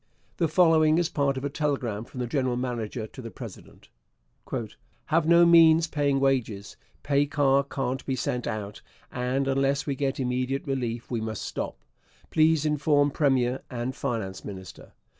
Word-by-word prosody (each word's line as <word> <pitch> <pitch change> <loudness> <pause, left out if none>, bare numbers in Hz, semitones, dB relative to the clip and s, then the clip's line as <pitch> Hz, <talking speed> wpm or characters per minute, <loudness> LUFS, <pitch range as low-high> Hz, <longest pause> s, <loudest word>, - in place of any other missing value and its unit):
The 165 - +2
following 160 -1 +4
is 170 -1 +1
part 140 -3 0
of 130 - -4
a - - -1
telegram 130 -8 -2
from 125 0 -7
the - - -1
general 130 0 0
manager 120 -3 -3
to 120 - -11
the 115 - -7
president: 100 - -11 1.2
Have 160 0 +1
no 170 +1 +6
means 165 -1 +6
paying 145 -3 0
wages, 125 -7 -1 0.3
pay 140 0 +2
car 140 -1 +3
can't 135 -1 -3
be 135 - 0
sent 125 -1 -2
out, 105 -2 -5 0.3
and 125 +2 -1
unless 135 +1 +1
we 140 - -1
get 135 0 -2
immediate 130 +1 -1
relief 120 -4 -3
we 115 -2 -1
must 110 -1 -4
stop. - - -5 0.5
Please 155 -1 +3
inform 145 -1 +2
Premier 130 -3 +1
and 125 +1 -4
Finance 105 -8 -4
Minister. 95 -2 -10
135 Hz, 160 wpm, -26 LUFS, 120-145 Hz, 1.2 s, no